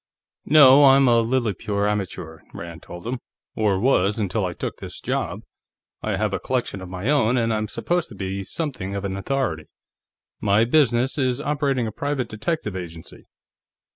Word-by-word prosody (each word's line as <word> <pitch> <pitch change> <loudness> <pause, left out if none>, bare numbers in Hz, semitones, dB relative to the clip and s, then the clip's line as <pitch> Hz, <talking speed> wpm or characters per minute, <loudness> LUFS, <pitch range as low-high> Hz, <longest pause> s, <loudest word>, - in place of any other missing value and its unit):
"No, 145 -1 +8
I'm 135 0 +6
a 120 -1 +5
lily 115 -2 0
pure 100 +2 -1
amateur," 95 -6 -3 0.2
Rand 85 0 -8
told 85 +2 -10
him. 120 +2 -3 0.4
"Or 105 -3 +1
was 105 -4 +2
until 100 -1 -1
I 90 - -4
took - - -5
this - - -7
job. - - -3 0.6
I 110 -2 -1
have 105 0 -1
a - - -1
collection 125 -6 -2
of 95 - -8
my 90 +4 -5
own, 130 -4 +3
and 115 -2 +1
I'm 110 0 -1
supposed 175 +9 -1
to 110 - -11
be 95 0 -4
something 100 - -4
of 100 0 -3
an 95 -1 -3
authority. 95 - -2 0.7
My 105 +2 +3
business 130 0 +2
is 130 -1 +1
operating 145 -4 0
a 110 - -3
private 140 +2 -2
detective 110 - -3
agency." 85 -3 -9
110 Hz, 170 wpm, -23 LUFS, 95-130 Hz, 0.7 s, No